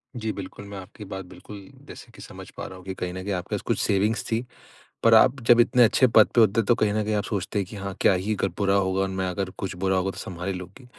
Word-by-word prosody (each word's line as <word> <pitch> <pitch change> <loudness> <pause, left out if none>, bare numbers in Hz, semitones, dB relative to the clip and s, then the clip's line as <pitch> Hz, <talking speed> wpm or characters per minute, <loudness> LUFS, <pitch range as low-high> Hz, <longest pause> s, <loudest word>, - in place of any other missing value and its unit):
जी, 110 -2 -3
बिल्कुल 100 +1 -8
मैं 100 - -7
आपकी 95 +3 -10
बात 95 -1 -6
बिल्कुल, 100 +2 -12 0.2
जैसे - - -12
कि - - -13
समझ - - -11
पा - - -5
रहा 95 - -10
हूँ 90 - -15
कि 95 - -4
कहीं 90 -1 -4
न 95 0 -6
कहीं 100 +1 -2
आपके 90 -1 -3
पास - - -4
कुछ - - 0
सेविंग्स 105 +3 +1
थी। 115 +2 0 0.6
पर 115 - +6
आप 125 +4 +5
जब 120 0 +7
इतने 120 +1 +5
अच्छे 130 +3 +4
पद 110 -2 +6
पे 120 - +6
होते 110 +1 +3
हैं, 110 - -7
तो 120 - +4
कहीं 105 -2 +1
न 110 0 0
कहीं 110 - -2
आप 105 - 0
सोचते 100 0 -3
हैं 95 - -1
कि - - -9
हाँ, 100 -1 -5
क्या - - +5
ही 95 +4 -1
अगर 95 - 0
बुरा 100 -1 +2
होगा 95 -1 +1
और 95 - +1
मैं 95 0 -2
अगर 95 +1 -3
कुछ 95 -2 -4
बुरा 95 0 +2
होगा, 95 +1 0
तो - - -13
सँभाल 90 0 -6
ही 95 - -1
लूँगी। 90 +8 -10
100 Hz, 295 wpm, -25 LUFS, 95-110 Hz, 0.6 s, जब